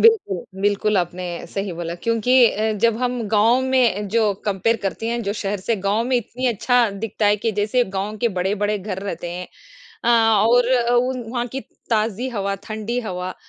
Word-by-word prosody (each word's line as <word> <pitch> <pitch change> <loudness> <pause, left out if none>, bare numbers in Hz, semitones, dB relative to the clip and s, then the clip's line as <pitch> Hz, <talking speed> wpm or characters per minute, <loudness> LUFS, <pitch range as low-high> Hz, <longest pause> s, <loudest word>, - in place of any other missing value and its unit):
बिल्कुल, 405 - +3 0.2
बिल्कुल 205 0 +2
आपने 180 +1 -2 0.3
सही 195 -1 -3
बोला 170 0 -4
क्योंकि 230 +2 +1 0.2
अ, 220 +1 -1
जब 230 -1 +4
हम 245 -1 -1
गाँव 225 +4 +4
में 245 -6 +2
जो 215 -1 +2
कंपेयर 210 +3 +1
करती 200 +3 -3
हैं, 235 0 -1
जो 200 -1 -1
शहर 205 -2 -3
से 225 +3 0
गाँव 215 +4 +2
में 255 0 +1
इतनी 250 +2 -3
अच्छा 240 +1 +2
दिखता 210 +1 -2
है 205 +1 +4
कि 220 +1 -1
जैसे 240 +4 +2
गाँव 210 +3 -3
के - - +5
बड़े-बड़े 205 +2 0
घर 190 -1 -5
रहते 175 -3 -5
हैं। 180 +1 -6 0.6
अ, - - +2
और 230 +2 +4 0.2
उ 250 +2 +2 0.2
वहाँ 240 -1 -2
की 270 +3 -5 0.3
ताज़ी 225 +2 0
हवा, 200 -5 -2
ठंडी 220 +3 -3
हवा 185 -4 -5
215 Hz, 180 wpm, -21 LUFS, 200-240 Hz, 0.6 s, के